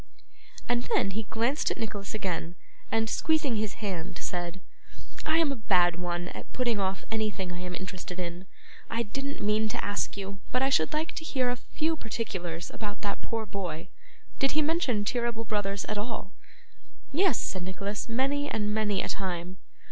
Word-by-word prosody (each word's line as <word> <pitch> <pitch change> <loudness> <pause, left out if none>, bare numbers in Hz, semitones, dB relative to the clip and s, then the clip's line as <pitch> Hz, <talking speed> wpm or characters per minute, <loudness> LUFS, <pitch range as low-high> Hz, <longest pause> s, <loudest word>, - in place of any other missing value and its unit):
And 240 0 +3
then 195 - +3
he 215 +1 -2
glanced 240 +7 +2
at - - -1
Nicholas 205 -2 -3
again, 175 -4 -1 0.4
and, 225 0 +3
squeezing 295 -2 +3
his 210 -2 0
hand, 180 -2 -2
said, 175 0 -2 0.7
'I 315 +1 +5
am 325 -3 +4
a - - 0
bad 180 -6 +4
one 175 0 -1
at - - -8
putting 240 -4 +2
off 190 0 0
anything 215 -4 0
I 175 - -4
am 180 0 -3
interested 185 -1 -5
in. 175 +1 -4 0.4
I 230 +1 +1
didn't 275 +5 -3
mean 215 +1 +3
to - - -1
ask 205 0 0
you, 195 0 -4
but 255 +1 +3
I 270 - +3
should 160 -10 +4
like 315 +2 0
to - - -2
hear 255 -5 +2
a - - +1
few 315 +5 0
particulars 185 - -3
about 205 -2 -4
that 200 -1 -1
poor 225 -1 -2
boy. 180 -6 -4 0.5
Did 275 -1 +4
he 305 +1 +4
mention 285 -10 +2
Cheeryble 235 -1 0
Brothers 200 -2 0
at 210 -1 -1
all?' 210 -3 -3 0.8
'Yes,' 345 - +5
said 185 - -1
Nicholas, 200 +5 -3
'many 275 +4 +2
and 210 -1 0
many 210 -3 +2
a - - -1
time. 180 -1 -2
210 Hz, 180 wpm, -30 LUFS, 185-245 Hz, 0.8 s, I